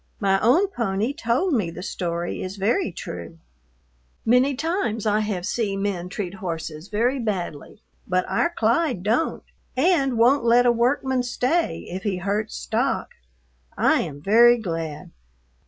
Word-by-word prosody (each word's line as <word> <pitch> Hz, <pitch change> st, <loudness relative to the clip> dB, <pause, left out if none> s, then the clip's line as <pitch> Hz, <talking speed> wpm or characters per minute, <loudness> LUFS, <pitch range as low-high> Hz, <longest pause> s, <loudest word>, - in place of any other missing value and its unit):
My 195 Hz, -2 st, +2 dB
own 265 Hz, -, +4 dB
pony 225 Hz, -, -1 dB
told 315 Hz, +3 st, 0 dB
me 210 Hz, -9 st, +1 dB
the 175 Hz, +2 st, -8 dB
story 170 Hz, -2 st, -3 dB
is 185 Hz, +1 st, -5 dB
very 215 Hz, -, +1 dB
true. 85 Hz, -, -8 dB, 0.9 s
Many 255 Hz, +4 st, +4 dB
times 290 Hz, -, -1 dB
I 210 Hz, 0 st, +2 dB
have 205 Hz, -4 st, -2 dB
see 210 Hz, -2 st, -1 dB
men 195 Hz, -3 st, -2 dB
treat 185 Hz, -2 st, -4 dB
horses 165 Hz, -3 st, -5 dB
very 240 Hz, +6 st, 0 dB
badly, 200 Hz, -, -4 dB, 0.2 s
but 185 Hz, 0 st, +1 dB
our 340 Hz, -, +1 dB
Clyde 240 Hz, -, 0 dB
dont, 225 Hz, +10 st, 0 dB, 0.3 s
and 275 Hz, -5 st, +2 dB
wont 245 Hz, +4 st, +4 dB
let 240 Hz, +1 st, +5 dB
a 240 Hz, -, +6 dB
workman 255 Hz, +2 st, +1 dB
stay 250 Hz, -, -1 dB
if 185 Hz, +2 st, -5 dB
He 195 Hz, -2 st, -1 dB
hurts 205 Hz, +4 st, -2 dB
stock. 245 Hz, +5 st, -1 dB, 0.7 s
I 315 Hz, -, +3 dB
am 145 Hz, -4 st, -6 dB
very 235 Hz, +5 st, +6 dB
glad. 165 Hz, -8 st, -5 dB
215 Hz, 145 wpm, -23 LUFS, 185-250 Hz, 0.9 s, a